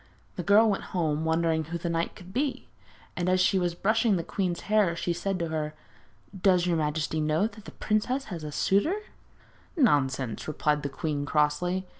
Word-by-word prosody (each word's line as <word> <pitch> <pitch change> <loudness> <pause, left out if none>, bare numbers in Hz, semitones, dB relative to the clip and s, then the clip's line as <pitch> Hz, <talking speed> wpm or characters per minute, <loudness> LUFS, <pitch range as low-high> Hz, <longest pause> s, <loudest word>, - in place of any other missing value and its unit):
The 180 - -3
girl 205 +6 +5
went 200 -2 -1
home 155 -2 0
wondering 160 -1 +1
who 170 +3 -4
the 170 - -4
knight 165 0 -1
could 185 0 -13
be; 275 +3 -2 0.5
and 180 0 -1
as 185 0 +3
she 190 +1 +3
was 175 -1 -1
brushing 220 +3 +2
the 170 - -1
queen's 185 -3 -2
hair, 205 -5 +2
she 170 +1 -1
said 185 +3 -2
to 170 -2 -2
her: 155 -1 -3 0.7
'Does 180 -2 +4
your 175 -2 +1
majesty 155 0 -1
know 155 +5 +2
that 220 -1 -7
the - - -9
princess 250 +6 -1
has 175 -6 -7
a 150 - -5
suitor?' 200 - +2
[Illustration: 425 0 -8
THE - - -31
POISONED 300 -7 +5
NAIL] - - +5
'Nonsense!' 130 -5 -1
replied 150 -1 0
the 145 - -3
queen 145 0 -3
crossly. 160 +6 +1
170 Hz, 205 wpm, -27 LUFS, 155-195 Hz, 0.7 s, girl